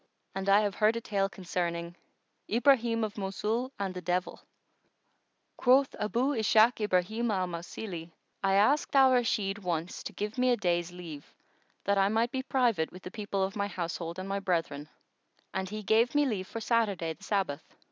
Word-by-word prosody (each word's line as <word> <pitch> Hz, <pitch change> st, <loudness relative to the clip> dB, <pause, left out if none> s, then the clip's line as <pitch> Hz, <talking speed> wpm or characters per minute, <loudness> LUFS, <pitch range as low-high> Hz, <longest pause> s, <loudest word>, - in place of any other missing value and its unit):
And 195 Hz, 0 st, -2 dB
I 200 Hz, +2 st, +6 dB
have 205 Hz, -2 st, 0 dB
heard 215 Hz, +2 st, +3 dB
a -, -, -1 dB
tale 200 Hz, -3 st, -1 dB
concerning 170 Hz, -3 st, -3 dB, 0.5 s
IBRAHIM 235 Hz, -1 st, +3 dB
OF 215 Hz, -1 st, -4 dB
MOSUL 215 Hz, +6 st, -2 dB
AND 195 Hz, -2 st, -3 dB
THE 180 Hz, -, -6 dB
DEVIL.[FN#118] 180 Hz, +2 st, -2 dB, 1.1 s
Quoth 265 Hz, +2 st, +4 dB
Abu 240 Hz, +6 st, +1 dB
Ishak 220 Hz, +1 st, +4 dB
Ibrahim 210 Hz, +4 st, +1 dB
al 190 Hz, -3 st, +1 dB
Mausili:—I 175 Hz, +1 st, -5 dB
asked 275 Hz, +10 st, +3 dB
Al 265 Hz, -1 st, +7 dB
Rashid 210 Hz, -5 st, +1 dB
once 175 Hz, -2 st, -3 dB
to -, -, -6 dB
give 210 Hz, +4 st, -4 dB
me 255 Hz, 0 st, +3 dB
a 245 Hz, -, +3 dB
day's 175 Hz, -3 st, 0 dB
leave 170 Hz, -5 st, -9 dB, 0.5 s
that 200 Hz, 0 st, +2 dB
I 195 Hz, 0 st, +4 dB
might 225 Hz, +3 st, +1 dB
be 265 Hz, -1 st, -2 dB
private 240 Hz, -11 st, +1 dB
with 185 Hz, -, -12 dB
the 180 Hz, -, -7 dB
people 200 Hz, -3 st, -2 dB
of 195 Hz, +2 st, -2 dB
my 200 Hz, -1 st, -1 dB
household 170 Hz, -2 st, -4 dB
and 185 Hz, +1 st, -5 dB
my 200 Hz, 0 st, -1 dB
brethren, 165 Hz, -6 st, -2 dB, 0.6 s
and 190 Hz, 0 st, -2 dB
he 215 Hz, +1 st, -5 dB
gave 225 Hz, +6 st, +3 dB
me 290 Hz, 0 st, +4 dB
leave 200 Hz, -8 st, -2 dB
for 230 Hz, -, -6 dB
Saturday 205 Hz, -8 st, 0 dB
the -, -, -20 dB
Sabbath. 190 Hz, -9 st, -2 dB
200 Hz, 175 wpm, -30 LUFS, 180-230 Hz, 1.1 s, Al